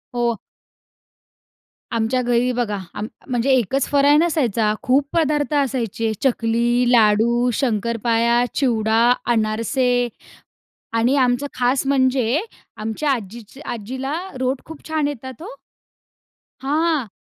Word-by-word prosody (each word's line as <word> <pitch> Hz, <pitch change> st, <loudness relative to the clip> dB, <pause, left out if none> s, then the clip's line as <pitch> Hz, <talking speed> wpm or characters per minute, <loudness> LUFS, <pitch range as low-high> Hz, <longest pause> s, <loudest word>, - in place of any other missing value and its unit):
हो. 235 Hz, -2 st, 0 dB, 1.5 s
आमच्या 230 Hz, +2 st, 0 dB
घरी 245 Hz, 0 st, +1 dB
बघा 235 Hz, -4 st, -1 dB, 0.2 s
आम 210 Hz, +1 st, -4 dB, 0.2 s
म्हणजे 250 Hz, 0 st, 0 dB
एकच 260 Hz, +2 st, +2 dB
फराळ 285 Hz, 0 st, +5 dB
नसायचा. 235 Hz, -, +1 dB
खूप 275 Hz, +1 st, +2 dB
पदार्थ 300 Hz, -2 st, +1 dB
असायचे. 230 Hz, -4 st, -2 dB
चकली, 240 Hz, -1 st, +1 dB
लाडू, 235 Hz, +2 st, +4 dB
शंकरपाळ्या, 235 Hz, 0 st, +1 dB
चिवडा, 225 Hz, -4 st, +2 dB, 0.3 s
अनारसे 240 Hz, +3 st, +1 dB, 0.9 s
आणि 245 Hz, +5 st, +2 dB
आमचं 255 Hz, +1 st, +2 dB
खास 255 Hz, +2 st, +1 dB
म्हणजे 260 Hz, -1 st, +2 dB, 0.4 s
आमच्या 220 Hz, +7 st, -2 dB
आजी 230 Hz, +1 st, -5 dB
आजीला 260 Hz, +6 st, -4 dB, 0.3 s
रोट 260 Hz, +1 st, -1 dB
खूप 320 Hz, -1 st, -11 dB
छान 310 Hz, -2 st, 0 dB
येतात 260 Hz, 0 st, -8 dB
हो. 390 Hz, -, -7 dB, 1.1 s
हां. 300 Hz, -2 st, 0 dB
245 Hz, 105 wpm, -21 LUFS, 230-275 Hz, 1.5 s, फराळ